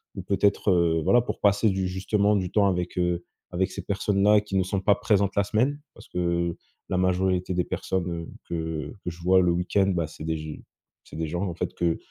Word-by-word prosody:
ou - - -4
peut-être 90 -4 +2
voilà 120 +7 +5
pour - - -5
passer 105 +2 +3
du, 95 -1 -1
justement 100 +3 +1
du 95 -2 -1
temps 100 -2 +3
avec, 90 -2 -2
heu, 90 -1 0 0.3
avec 95 +2 0
ces - - -5
personnes 100 0 -1
là 105 0 +6
qui 100 -2 -3
ne 95 - +3
sont 95 +1 -2
pas 100 0 +4
présentes 100 -1 +1
la 100 - +3
semaine, 130 +8 0
parce - - -15
que 85 -1 -1 0.3
la 90 - 0
majorité 90 0 +1
des 90 - +1
personnes, 90 +1 -2
heu, 85 -1 -5 0.2
que 80 -3 -3
que - - -2
je 85 0 -10
vois 95 +1 +5
le 90 -1 +3
week-end, 90 +3 +1
bah 85 -2 0
c'est 80 +1 -9
g 75 0 -7 0.4
c'est - - -13
des 80 0 -2
gens 85 +3 -3
en 85 - -5
fait - - -3
que 85 -1 0
90 Hz, 220 wpm, -26 LUFS, 85-100 Hz, 0.4 s, là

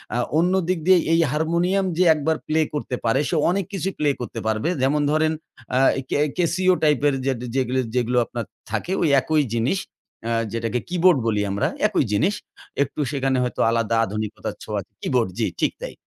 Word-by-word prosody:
আ - - +1 0.2
অন্যদিক 180 +1 +1
দিয়ে 185 -1 +7
এই 165 - +4
হারমোনিয়াম 170 +5 +1
যে 185 - +4
১ 155 - -4
বার 160 -1 +2
প্লে 155 +1 +1
করতে 145 -4 -3
পারে, 115 +4 +2
সে - - 0
অনেক 190 +1 0
কিছুই 195 0 -2
প্লে 150 -1 +2
করতে 120 -1 -5
পারবে। 110 +7 0
যেমন 140 +3 +2
ধরেন 155 +1 +2 0.4
আ - - +4 0.3
কে - - 0 0.2
কেসিও 180 +1 +2
টাইপের 145 -1 +3
যেট 135 -3 0 0.2
যেগ 130 -2 +1 0.3
যেগুলো 125 0 +1
আপনার 115 0 -5 0.3
থাকে, 180 - -2
ওই - - +3
একই 155 +3 +1
জিনিস 120 +12 +1 0.5
আ - - -1 0.2
যেটাকে 115 +1 -1
কিবোর্ড 180 -2 +4
বলি 105 -2 +1
আমরা, 100 +1 0 0.2
একই - - +1
জিনিস। 145 - +2 0.5
একটু 145 - -8
সেখানে 135 -2 0
হয়তো 125 - -4
আলাদা 115 -1 +1
আধুনিকতার 105 +1 -5
ছোঁয়া - - -3 0.2
কিবোর্ড 120 -6 +1
জ্বি, - - +1
ঠিক - - +2
তাই। - - -6
150 Hz, 180 wpm, -22 LUFS, 120-175 Hz, 0.5 s, দিয়ে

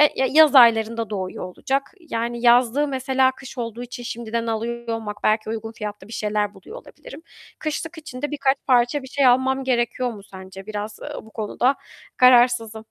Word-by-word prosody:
ya 265 - +1
yaz 310 -1 +6
aylarında 230 -2 +5
doğuyor 190 -3 -5
olacak 265 +9 -3
yani 235 -6 -4
yazlığı 245 +4 +4
mesela 265 -1 +1
kış 260 0 -12
olduğu 235 0 -5
için 245 0 -8
şimdiden 230 0 -4
alıyor 235 +1 -3
olmak, 220 -2 -4
belki 215 0 +1
uygun 225 0 -5
fiyatlı 210 -2 -7
bir 230 - -10
şeyler 210 -1 -1
buluyor 465 - -12
olabilirim. - - -13 0.4
Kışlık 325 +2 -4
için 255 -5 -9
de 295 - -3
birkaç 275 -2 +1
parça 250 +2 +2
bir - - -9
şey 275 0 +1
almam 265 +2 +2
gerekiyor 245 -1 0
mu 200 -2 -12
sence? 190 0 -11
Biraz, 210 0 -6
eee, - - -7
bu 220 - -16
konuda 245 +5 0 0.4
kararsızım. 240 -3 +4
235 Hz, 170 wpm, -22 LUFS, 220-265 Hz, 0.4 s, yaz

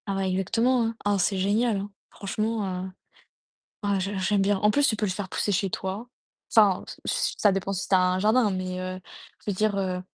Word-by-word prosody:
Ah 195 - -1
ouais 190 -1 0
exactement, 230 +7 +1
hein. 225 0 -2
Ah 205 -1 +2
c'est 195 +2 +1
génial, 210 +4 +1
hein. 200 +1 -5 0.2
Franchement, 215 +2 -2 0.2
heu, - - -6 0.9
ah 200 -1 +1
j'ai 195 +2 -2
j'aime 195 +2 +1
bien. 195 0 +2
En 210 +2 +3
plus, 285 +5 +3
tu - - +2
peux 210 - -1
les 190 - -1
faire 190 0 -5
pousser 205 - -1
chez 195 +1 +1
toi. 195 +7 -4 0.5
Enfin, 205 -4 +5
ç - - -10
ç - - 0
ça 205 - +5
dépend 195 +1 -2
si 185 -2 -3
tu - - +3
as - - +7
un 185 0 +2
jardin, 215 +2 +3
mais, 185 -1 -3
heu, 185 0 -5 0.4
je - - -2
veux - - -1
dire, 215 +1 +1
heu, 185 -2 -1
200 Hz, 230 wpm, -26 LUFS, 190-215 Hz, 0.9 s, as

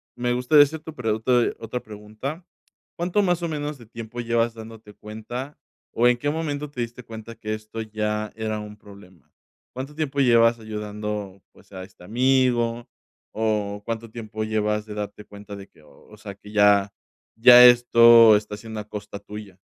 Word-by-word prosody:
me 120 0 -1
gusta 125 +5 +3
esa 150 +2 +4
tu 155 0 -11
pregunta 110 +1 -2
de - - -1
otra 115 +2 -5
pregunta. 110 - -8 0.5
¿Cuánto 180 +4 0
más 175 -2 0
o - - 0
menos 150 -1 -4
de 120 - -15
tiempo 115 +1 -9
llevas 115 0 0
dándote 110 -2 -12
cuenta 115 +6 -8 0.3
o 120 +1 +3
en 125 0 +3
qué 145 +4 -2
momento 150 -2 -4
te 125 - -5
diste 120 +1 -6
cuenta 115 0 -10
que 110 -1 -5
esto 110 +1 -7
ya 105 0 -3
era 110 -1 -3
un 105 0 -9
problema? 100 -4 -17 0.4
¿Cuánto 135 +3 -7
tiempo 145 -3 -3
llevas 115 -2 +4
ayudando, 105 -2 -6
pues - - -23
a 95 0 -7
este 95 -2 -16
amigo? 120 0 +1 0.4
¿O 105 -2 -2
cuánto 115 0 -5
tiempo 110 -1 -6
llevas 105 -1 -1
de 105 - -8
darte 105 0 -6
cuenta 100 0 -11
de 100 0 -11
qué, 75 - -24
o 105 +7 -19
sea 100 -1 -9
que 105 +1 -15
ya 105 -1 +4 0.4
ya 125 +1 +9
esto 115 -2 +7
está 105 0 -6
siendo 110 0 -8
a 105 0 -9
costa 105 -1 -7
tuya? 105 -2 -10
110 Hz, 175 wpm, -23 LUFS, 105-125 Hz, 0.5 s, ya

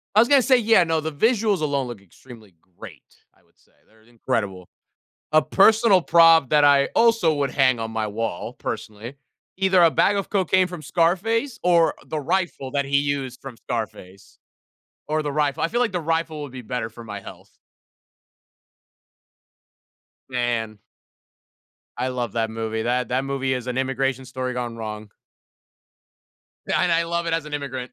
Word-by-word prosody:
I 215 - +6
was 235 - +5
gonna 280 0 +5
say, 255 +1 +4
yeah, 225 -5 +4
no, 160 -1 0
the 160 +1 -4
visuals 215 - +1
alone 140 -4 -1
look 120 -5 -8
extremely 105 0 -16 0.2
great, - - -11 0.3
I - - -32
would - - -37
say, - - -31 0.2
they're 110 0 -26
incredible. 100 -5 -4 0.7
A 155 - +5
personal 200 +4 +4
prop 165 -5 +5
that 150 -1 +4
I 140 -1 +5
also 230 -8 +4
would 140 -2 -1
hang 130 -2 +2
on 115 0 -4
my 110 -1 -2
wall, 105 -3 -4
personally, 110 +5 -7 0.4
either 190 -2 +3
a 165 - +6
bag 200 +5 +2
of 195 - -3
cocaine 190 -2 +2
from 180 -3 -9
Scarface 195 - 0
or 170 -2 +3
the 155 - -4
rifle 145 -4 -2
that 140 -1 0
he 140 0 +1
used 140 -3 -3
from 135 -4 -10
Scarface. 105 -4 -7 0.7
Or, 155 0 0
the 145 -1 -3
rifle 145 -2 0
I 165 - +1
feel 240 +5 -1
like 235 -4 +1
the 175 -2 -2
rifle 165 -1 -2
would 145 -3 -8
be 130 - -8
better 115 -1 -4
for 115 +2 -12
my 105 -3 -7
health. - - -14 2.7
Man. 120 -4 -2 1.2
I 130 +1 -1
love 120 -4 -4
that 115 -1 -1
movie, 110 0 -3
that 125 0 0
that 130 +2 -1
movie 135 -1 -1
is 125 -2 -4
an 125 0 -4
immigration 135 0 -1
story 130 0 -4
gone 120 -2 -5
wrong. 110 -1 -7 1.6
And 175 - +1
I 165 0 +2
love 170 0 -2
it 165 - 0
as 165 -2 -1
an 150 - -8
immigrant. 130 -3 -5
140 Hz, 170 wpm, -23 LUFS, 120-170 Hz, 2.7 s, I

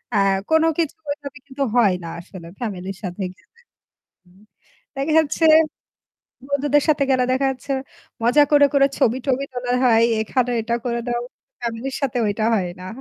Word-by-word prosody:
আ - - +4 0.3
কোন 320 0 +4
কিছুভাবে 290 -3 -4
কিন্তু 275 0 -3
হয় 220 -6 +4
না - - -6
আসলে 170 0 -11
ফ্যামিলির 195 -5 -5
সাথে 185 +1 -4
গেলে। - - -30 0.7
হুম, 180 +2 -23 0.5
দেখা 275 +3 -1
যাচ্ছে 320 +1 +1 1.0
বন্ধুদের 285 +1 +2
সাথে 295 -2 +3
গেলে 255 -1 +3
দেখা 265 +1 +1
যাচ্ছে। 265 +1 -5 0.5
মজা 250 +6 +5
করে, 290 -1 +6
করে, 275 -1 +5
ছবি 250 -2 +2
টবি 270 +1 +1
তোলা 245 0 -3
হয়, 230 -2 +5 0.2
এখানে 245 +3 0
এটা 235 +1 -1
করে 235 -1 -1
দাও। 240 0 -1 0.4
ফ্যামিলির 235 +3 -4
সাথে 270 -2 0
ওইটা 210 +1 -1
হয় 190 -5 0
না। 185 - -8
250 Hz, 155 wpm, -21 LUFS, 225-280 Hz, 1.0 s, করে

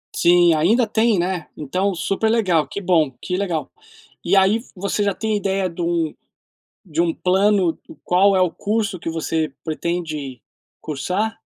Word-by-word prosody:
Sim, 175 -1 +5
ainda 215 +10 +3
tem, 220 -2 +2
né? 175 -2 -2
Então 185 +7 -1
super 195 +5 -1
legal, 190 -9 +2
que 200 - -6
bom, 165 -6 +2
que 180 0 -2
legal. 165 - -2 0.5
E 190 +3 +2
aí 195 +4 +4 0.2
você 200 +2 -1
já 200 -1 +1
tem 220 +2 -2
a - - +2
ideia 195 -2 -1
de 170 +1 -7
um 170 -2 0 0.8
de 160 +2 +1
um 170 -1 +1
plano, 190 -2 +2 0.2
qual 195 +2 +3
é 185 - +3
o 180 -2 +3
curso 205 0 -2
que 165 - -4
você 160 -2 -2
pretende 155 -5 -4 0.4
cursar? 185 +9 -2
180 Hz, 160 wpm, -21 LUFS, 165-200 Hz, 0.8 s, Sim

